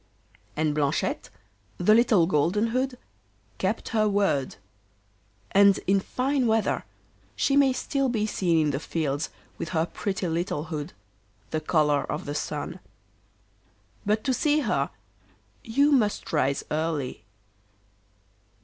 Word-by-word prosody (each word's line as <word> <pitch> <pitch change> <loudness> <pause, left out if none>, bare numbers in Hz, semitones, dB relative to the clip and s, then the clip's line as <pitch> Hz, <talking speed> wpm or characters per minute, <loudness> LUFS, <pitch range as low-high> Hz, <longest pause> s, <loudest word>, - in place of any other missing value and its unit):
And 155 -1 +1
Blanchette, 145 -2 -1 0.5
the 180 +4 +4
Little 220 -6 +5
Golden 180 +7 +1
hood, 255 +2 -1 0.6
kept 195 +4 -1
her 215 -2 +2
word. 195 -10 +1 1.0
And 200 0 +6
in 195 +1 +3
fine 255 +5 0
weather 220 -1 +1 0.5
she 275 - +1
may 280 -2 +5
still 270 +1 -1
be 220 -3 0
seen 180 -5 +1
in 150 - +1
the 140 - -2
fields 155 -2 -2 0.3
with 165 - -4
her 160 - +3
pretty 190 +1 -3
little 165 -2 -1
hood, 155 -3 -5 0.6
the 155 - -1
colour 150 -2 +2
of 150 - -4
the 145 - -4
sun. 150 0 -4 1.2
But 210 +2 0
to 265 - +1
see 300 +4 +2
her - - 0 0.7
you 280 +6 +3
must 220 -11 +1
rise 140 -2 +1
early. 155 -4 -2
190 Hz, 125 wpm, -26 LUFS, 155-225 Hz, 1.2 s, And